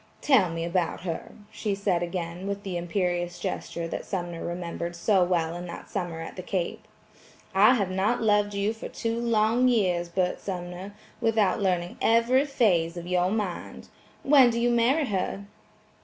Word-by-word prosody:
"Tell 235 -11 +4
me 165 0 -3
about 170 -1 -1
her," 170 -2 -5 0.2
she 205 -3 -2
said 195 -3 0
again 175 +1 -4
with 200 0 -3
the 190 -2 -4
imperious 175 0 -1
gesture 170 -1 -4
that - - -4
Sumner 175 -3 -4
remembered 170 0 -4
so 185 +2 +3
well 170 -2 0
in 175 +1 -6
that 170 - -9
summer 175 -4 -3
at 165 - -7
the 185 - -5
Cape. 180 -1 -3 0.7
"I 210 +6 +6
have 200 -5 -1
not 200 +6 +1
loved 205 -2 +2
you 200 +2 0
for 225 - -8
two 230 0 -2
long 230 +1 +3
years, 180 -8 +1
Bert 180 +1 0
Sumner, 180 +1 -6 0.2
without 220 -2 +2
learning 180 -2 0
every 235 +4 +4
phase 180 - +1
of 170 - -6
your 180 0 +1
mind. 205 -4 -4 0.3
When 270 -3 +7
do 235 0 -1
you 240 +1 +2
marry 250 +6 +3
her?" 200 -2 -2
190 Hz, 170 wpm, -27 LUFS, 175-220 Hz, 0.7 s, When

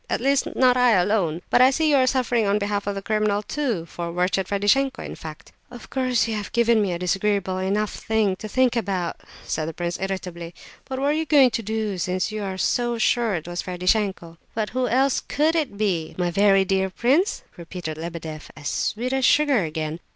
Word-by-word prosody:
At - - 0
least, 275 +2 +2
not 255 -1 +4
I 250 -2 +5
alone. 180 -4 +1
But - - +5
I 255 - +8
see 315 +4 +1
you 285 - +5
are 260 -1 +3
suffering 245 -4 +1
on 200 +1 +2
behalf 205 -1 -2
of 200 - -1
the 195 - -5
criminal 215 -1 0
too, 235 - -2
for 170 0 -6
wretched 180 +2 0
Ferdishenko, 205 +7 +1
in - - -6
fact!" 155 -1 -10 0.2
"Of 245 -1 -12
course 255 -3 +1
you 225 - -2
have 205 -1 -5
given 235 -1 +3
me 200 -3 0
a 175 - -2
disagreeable 190 +1 0
enough 200 +3 0
thing 220 -4 0
to 215 - -7
think 255 +2 +2
about," 190 -6 -2 0.2
said 155 0 -3
the 165 - -6
prince, 175 0 -3
irritably, 180 -3 -5 0.3
"but 265 - -5
what 275 +2 0
are - - +2
you 320 +1 -1
going 275 -4 +5
to 230 - -2
do, 215 -3 -3
since 185 +4 -1
you 215 0 -4
are 190 -2 -4
so 240 +4 0
sure 230 -1 +1
it 160 -1 -5
was 175 0 -3
Ferdishenko?" 180 -2 -1 0.2
"But 220 -1 -2
who 255 0 0
else 265 +2 +2
could 310 +3 0
it 290 -11 -1
be, 185 -7 -1
my 175 -1 0
very 195 +1 +4
dear 190 0 +1
prince?" 270 - +1
repeated 170 -2 -6
Lebedeff, 160 -2 -7
as 150 -2 -4
sweet 245 +4 -2
as 265 0 0
sugar 285 -6 +4
again. 155 0 -4
205 Hz, 210 wpm, -23 LUFS, 180-245 Hz, 0.3 s, I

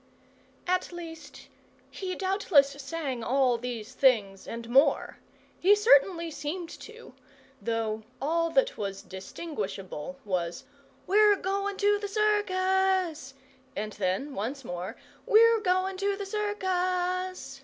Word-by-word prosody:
At 365 0 0
least, 325 -3 -9 0.4
he 370 -2 -4
doubtless 375 -7 +3
sang 275 -3 -4
all 255 -1 +2
these 235 -3 -6
things 210 -8 +2
and 230 0 -6
more 265 +5 +3 0.4
he 395 +4 +6
certainly 335 -4 +4
seemed 330 +4 -5
to; 455 +1 -12 0.5
though 225 -1 -2 0.2
all 330 +4 +1
that - - +1
was 195 -2 -4
distinguishable 195 - -6
was, 175 -3 -2 0.4
"We're 415 +1 +5
goin' 395 +1 -2
to 410 0 +3
the 410 - -4
circus!" 380 -7 +1 0.4
and 210 +1 -4
then, 200 +9 -2
once 255 +6 -4
more, 180 0 -5 0.3
"We're 460 +1 +6
goin' 370 -1 0
to 400 +1 0
the 400 0 -5
circus!" 370 -6 -2
330 Hz, 115 wpm, -28 LUFS, 245-385 Hz, 0.5 s, he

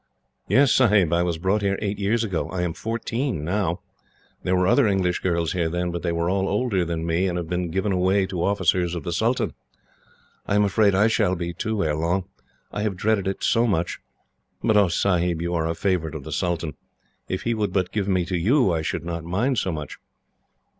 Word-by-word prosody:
"Yes, 140 -2 +4
Sahib. 105 -9 +4
I 85 - +3
was 85 -2 0
brought 95 +5 +1
here 100 -1 0
eight 105 -1 -3
years 110 +4 +1
ago. 95 -7 -2
I 90 -1 -2
am 85 -2 -1
fourteen 115 - -3
now. 90 -1 -1 0.6
There 95 - 0
were 90 0 +2
other 120 +6 +4
English 95 -3 +1
girls 85 -3 0
here 85 -3 0
then, 90 +1 -2
but 85 0 -4
they 85 - -1
were 85 0 -1
all 95 +1 0
older 105 -3 +1
than 85 -1 -3
me, 85 +3 +1
and 90 -1 -2
have 85 -2 -3
been 90 0 -2
given 95 +4 -1
away 95 +1 +2
to 90 -3 -3
officers 90 -3 +1
of 85 - -5
the 85 - -3
sultan. 115 +7 0 0.9
I 100 - +1
am 105 - +4
afraid 100 0 +3
I 100 +3 +4
shall 95 -4 +2
be, 85 0 -4
too, 105 +4 -2
ere 75 - 0
long. 85 +5 0 0.5
I 105 - -3
have 105 -3 -1
dreaded 100 -1 +1
it 95 - -3
so 115 +1 +3
much! 85 -5 -1 0.6
But 110 - +3
oh, 100 -2 +5
Sahib, 90 -1 +1
you 85 +1 -2
are 80 -1 0
a 80 - -2
favourite 85 -3 -1
of 75 - -6
the 80 - -8
sultan. 85 -2 -1 0.5
If 95 - -3
he 115 - 0
would 105 -4 -1
but 90 -1 0
give 100 -2 -1
me 90 -3 +1
to 90 +1 -3
you, 105 - +3
I 80 - 0
should 80 - -3
not 85 -1 -4
mind 105 +9 0
so 95 - -1
much." 75 -2 -6
90 Hz, 220 wpm, -24 LUFS, 85-105 Hz, 0.9 s, oh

